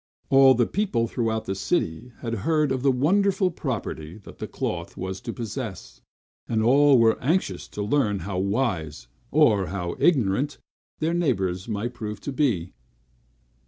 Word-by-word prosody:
All 135 -1 +7
the 120 0 +3
people 155 - 0
throughout 110 -2 -2
the 95 - -2
city 95 - -2
had 115 -1 -3
heard 150 +1 +1
of 130 -1 -1
the 135 0 +4
wonderful 185 +8 +2
property 105 - -5
the 100 - -13
cloth 85 -1 -4
was 95 +1 -5
to - - -5
possess; 115 -4 -6 0.5
and 110 -1 +1
all 140 +3 +6
were 115 -1 +3
anxious 135 - 0
to 105 - -5
learn 105 -4 +1
how 90 +1 -3
wise, 95 - -1 0.2
or 110 - +3
how 90 -3 -4
ignorant, 135 - +2 0.4
their 160 +2 0
neighbors 95 - 0
might 110 +3 -3
prove 105 -3 -6
to 140 - -4
be. 115 - 0
115 Hz, 150 wpm, -25 LUFS, 95-140 Hz, 0.5 s, All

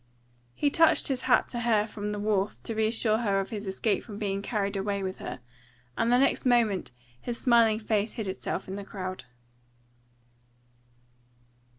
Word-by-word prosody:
He 290 - +1
touched 325 -1 +4
his 260 -2 -1
hat 250 - +4
to 240 - -4
her 225 -3 +2
from 210 -1 -5
the 210 - -3
wharf 205 -1 0
to 230 - -3
reassure 220 0 +1
her 200 -4 +1
of 195 - -4
his 210 -2 -5
escape 200 +2 0
from 210 -3 -9
being 200 -2 -2
carried 200 -2 -2
away 200 0 -1
with 190 0 -4
her, - - -7 0.5
and 230 +1 +1
the 245 - +6
next 275 +2 +2
moment 230 - +2 0.3
his 240 -1 -4
smiling 230 -3 +4
face 215 -1 -1
hid 220 -3 -4
itself 190 0 -4
in 190 +1 -5
the 200 - -5
crowd. 185 -6 -6
215 Hz, 170 wpm, -28 LUFS, 200-235 Hz, 0.5 s, the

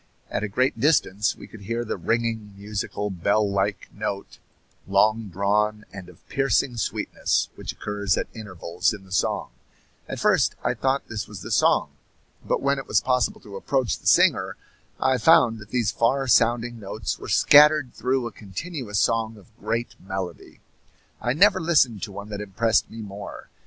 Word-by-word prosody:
At - - -1
a - - 0
great 125 +4 0
distance 110 - +2
we - - -11
could 110 - -13
hear 115 +4 -3
the - - -2
ringing, 110 +2 -2
musical, 105 0 -4
bell 100 +4 +1
like 100 +1 -1
note, 100 -1 -5 0.5
long 110 +3 +2
drawn 105 +3 0
and 95 -2 -9
of 90 - -19
piercing 135 -2 +1
sweetness, 110 - -1
which - - -6
occurs 100 -1 -1
at - - -1
intervals 90 -4 -2
in 100 - -13
the 95 - -18
song; 100 - 0 0.6
at - - -5
first - - +3
I - - +1
thought 135 +1 -1
this 110 -1 -5
was 100 -4 -9
the - - -7
song, - - +3 0.5
but - - -1
when 140 0 +2
it 135 - -8
was 105 - +3
possible 125 +1 0
to 100 -2 -11
approach 125 - -1
the - - -7
singer - - +4 0.4
I 130 -1 +2
found 120 -5 +5
that 105 0 -12
these 115 -3 0
far 135 +4 +1
sounding 120 0 +2
notes 100 0 -4
were - - -8
scattered 150 -3 +6
through 130 +2 -1
a 120 - -4
continuous 110 - -6
song 115 0 +1
of 105 +2 -19
great 115 +1 -2
melody. 95 -4 -6 0.6
I 120 - 0
never 190 +4 +5
listened 135 - +3
to 100 - -5
one 100 +2 -8
that 105 -1 -5
impressed 105 +3 +1
me 115 0 -8
more. 100 0 -9
110 Hz, 170 wpm, -24 LUFS, 100-125 Hz, 0.6 s, scattered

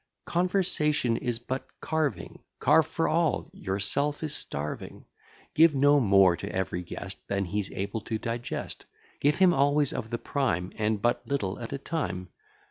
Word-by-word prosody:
Conversation 170 -8 +1
is 120 0 -1
but 130 +3 -5
carving; 150 - -2 0.2
Carve - - +4
for - - 0
all, - - +1
yourself 140 +11 -1
is 155 -2 -2
starving: 75 - -5 0.5
Give 160 -1 +6
no 145 +2 +5
more 95 -6 +5
to - - -6
every 95 -1 -2
guest, 95 +2 -6
Than 100 -1 0
he's 100 +2 -2
able 100 +3 -4
to 110 - -2
digest; 115 +2 -4 0.3
Give 145 +1 +3
him 185 -2 +5
always 145 -1 +3
of 110 - -4
the 120 - -2
prime; 115 - -1
And 105 -2 -1
but 120 0 +1
little 105 -9 -2
at 115 - -6
a 140 - -2
time. 115 - -3
120 Hz, 155 wpm, -28 LUFS, 100-145 Hz, 0.5 s, Give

